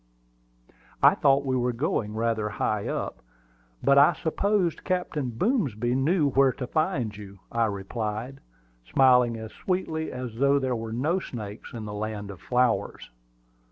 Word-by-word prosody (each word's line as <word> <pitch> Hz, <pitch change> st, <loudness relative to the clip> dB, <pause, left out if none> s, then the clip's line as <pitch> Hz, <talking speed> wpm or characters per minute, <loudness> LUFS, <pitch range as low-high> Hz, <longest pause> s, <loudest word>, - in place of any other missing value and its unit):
"I -, -, +8 dB
thought 140 Hz, 0 st, +3 dB
we 130 Hz, -1 st, 0 dB
were 125 Hz, -1 st, 0 dB
going 115 Hz, -5 st, -1 dB
rather 110 Hz, -1 st, 0 dB
high 105 Hz, 0 st, -1 dB
up; -, -, -4 dB, 0.6 s
but 140 Hz, 0 st, +6 dB
I 145 Hz, +5 st, +6 dB
supposed 180 Hz, 0 st, 0 dB
Captain 180 Hz, -7 st, -1 dB
Boomsby 125 Hz, -, 0 dB
knew 145 Hz, +3 st, +2 dB
where 135 Hz, 0 st, +4 dB
to 130 Hz, -, -5 dB
find 140 Hz, -, -1 dB
you," 100 Hz, -1 st, -10 dB
I 115 Hz, -1 st, +2 dB
replied, 110 Hz, +5 st, -4 dB, 0.5 s
smiling 125 Hz, -3 st, +5 dB
as 110 Hz, 0 st, -8 dB
sweetly 165 Hz, -4 st, -2 dB
as 125 Hz, -3 st, -6 dB
though 140 Hz, +2 st, +4 dB
there 130 Hz, -2 st, 0 dB
were 115 Hz, -1 st, -5 dB
no 150 Hz, +11 st, 0 dB
snakes 105 Hz, -, -8 dB
in 115 Hz, -3 st, -6 dB
the 105 Hz, -, -6 dB
Land 105 Hz, -1 st, -4 dB
of 95 Hz, -, -12 dB
Flowers. 125 Hz, -, 0 dB
125 Hz, 150 wpm, -26 LUFS, 110-140 Hz, 0.6 s, I